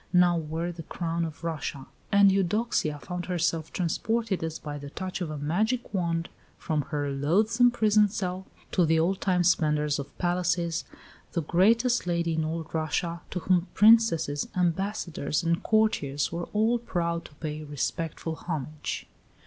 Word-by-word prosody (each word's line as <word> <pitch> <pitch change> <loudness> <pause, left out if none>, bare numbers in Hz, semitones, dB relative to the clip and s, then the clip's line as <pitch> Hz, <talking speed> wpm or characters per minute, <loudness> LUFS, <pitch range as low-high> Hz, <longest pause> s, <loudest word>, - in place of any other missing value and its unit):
now 180 -1 +5
wore 165 +2 -2
the 170 -1 -8
crown 170 +1 -3
of 160 0 -6
Russia; 155 -4 -4 0.3
and 200 -1 +6
Eudoxia 195 -4 +1
found 180 +3 -6
herself 165 -3 -1
transported, 200 +3 -1
as 160 -1 -3
by 150 -1 -6
the 145 0 -8
touch 185 +4 -5
of 170 - -2
a 155 - -4
magic 215 - -1
wand, 170 -3 0 0.3
from 155 -2 -1
her 145 -1 -1
loathsome 210 - +3
prison 215 -3 +4
cell 190 -2 -4 0.2
to 180 - +3
the 165 0 +3
old 185 +4 +1
time 180 -2 +2
splendours 150 -3 +2
of 140 0 -8
palaces 175 -1 0 0.5
the 170 - 0
greatest 225 - +3
lady 170 -1 0
in 160 0 0
all 160 +1 -2
Russia, 165 +2 -1
to 180 - -4
whom 180 +1 +2
Princesses, 210 -10 +5
ambassadors, 175 -3 -1
and 170 +3 +1
courtiers 210 -12 +1
were 170 +1 -3
all 225 +3 +2
proud 170 -7 -2
to 145 - -13
pay 155 0 -5
respectful 155 +3 -3
homage. 155 -2 -4
170 Hz, 155 wpm, -27 LUFS, 155-190 Hz, 0.5 s, and